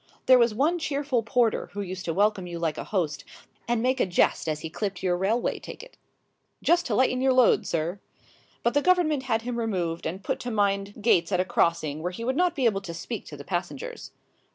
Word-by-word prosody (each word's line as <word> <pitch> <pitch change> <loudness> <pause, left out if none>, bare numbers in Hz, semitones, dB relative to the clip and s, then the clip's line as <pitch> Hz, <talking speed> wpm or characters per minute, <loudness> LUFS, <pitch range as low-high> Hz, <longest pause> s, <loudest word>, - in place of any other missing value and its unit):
There 255 -1 +7
was 235 -1 +4
one 300 +11 +1
cheerful 280 -5 -1
porter 235 0 +1
who 205 - -3
used 185 -1 -6
to 165 - -1
welcome 205 -2 +2
you 170 -1 -5
like 165 -3 -2
a - - -5
host, 175 -8 -2 0.4
and 235 -1 0
make 260 +1 +1
a - - +2
jest 175 -2 +1
as 155 0 -2
he 160 - -5
clipped 195 0 -4
your 180 -1 +2
railway 200 +7 0
ticket - - -11 0.7
"Just 345 +1 +3
to 215 - 0
lighten 255 +1 +2
your 265 0 +3
load, 255 -2 +4
sir!" 170 +4 -2 0.6
but 235 - +2
the 290 - +3
Government 340 -5 +3
had 225 -1 +1
him 240 0 -3
removed 180 -7 -2
and 185 +4 -5
put - - -2
to 245 - -5
mind 200 -1 -1
gates 175 -6 +3
at 180 - +2
a 185 - +2
crossing 160 -4 0
where 180 +2 -2
he 205 +6 -7
would 260 +2 0
not 355 +1 +2
be 270 -4 0
able 200 -4 +2
to 170 -4 -7
speak 210 +6 -5
to 145 - -9
the 140 - -9
passengers. 190 - -5
210 Hz, 225 wpm, -26 LUFS, 180-255 Hz, 0.7 s, There